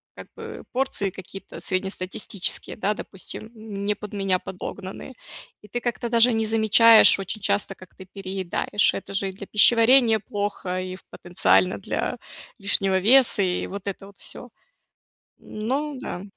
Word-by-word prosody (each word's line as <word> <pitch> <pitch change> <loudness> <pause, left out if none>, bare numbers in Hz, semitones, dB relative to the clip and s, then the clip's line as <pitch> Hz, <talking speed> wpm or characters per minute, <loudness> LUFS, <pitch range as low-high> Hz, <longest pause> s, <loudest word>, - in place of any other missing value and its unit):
как - - -11
бы, - - -9
порции 250 -6 -1
какие-то 190 +1 -10
среднестатистические, 190 0 -3
да, 210 0 0
допустим, 195 +1 -7
м, 210 -2 -7
не 210 0 +1
под 210 0 -10
меня 195 -2 +1
подогнанные, 190 +6 -8 0.5
и - - -13
ты 240 +4 -4
как-то 240 -1 -3
даже 235 0 +4
не 225 0 0
замечаешь 220 +1 +6
очень 195 +3 -5
часто, 200 0 0
как 185 -2 -17
ты 190 - -12
переедаешь. 195 +1 0
Это 195 - -7
же, 195 0 0
и - - -6
для 200 0 -10
пищеварения 230 +1 +5
плохо, 200 -3 -4
и, 185 0 -5
в - - -16
потенциально, 180 +1 +1
для - - -3 0.4
лишнего 195 -1 +2
веса, 240 +1 +5
и, 180 -2 0
вот, 200 0 -8
это 195 0 -5
вот, 200 0 -16
всё. - - -7 0.9
Ну 270 +8 -3
да. 180 -8 -6
200 Hz, 155 wpm, -24 LUFS, 190-220 Hz, 0.9 s, замечаешь